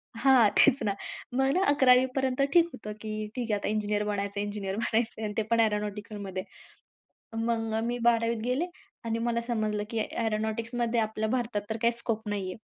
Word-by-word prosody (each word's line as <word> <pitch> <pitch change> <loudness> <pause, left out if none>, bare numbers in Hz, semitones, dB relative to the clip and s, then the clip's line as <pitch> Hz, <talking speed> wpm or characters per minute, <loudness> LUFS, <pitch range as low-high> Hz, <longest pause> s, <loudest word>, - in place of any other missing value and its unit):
हां. 240 -2 +5
तेच 255 - +5
ना 200 -2 0 0.4
मग 270 +5 +3
11वी 260 -3 +6
पर्यंत 265 0 0
ठीक 340 -1 +6
होतं, 210 -1 -7
की 215 -1 -4
ठीक 240 -3 -2
आहे, 205 - +2
आता - - -3
इंजिनिअर 210 -1 0
बनायचं, 200 0 -2
इंजिनिअर 205 -2 -3
बनायचं 230 +1 0
आहे - - -1
आणि 210 - -3
ते - - +3
पण 230 - +4
एअरोनॉटिकलमध्ये 210 -3 -1 0.9
मग 225 -1 -1
अ, 220 - +1
मी 240 +1 -1
12वी 230 0 +1
त - - -5
गेले 255 +8 0 0.4
आणि 230 0 -1
मला 235 0 0
समजलं 215 -3 -1
की 230 - -4
एरोनॉटिक्समध्ये 230 +2 -1
आपल्या 220 0 -1
भारतात 235 -4 -1
तर 220 - -2
काही 235 - +4
स्कोप 225 -2 -3
नाही 200 -2 -2
आहे. - - -8
225 Hz, 185 wpm, -28 LUFS, 210-235 Hz, 0.9 s, 11वी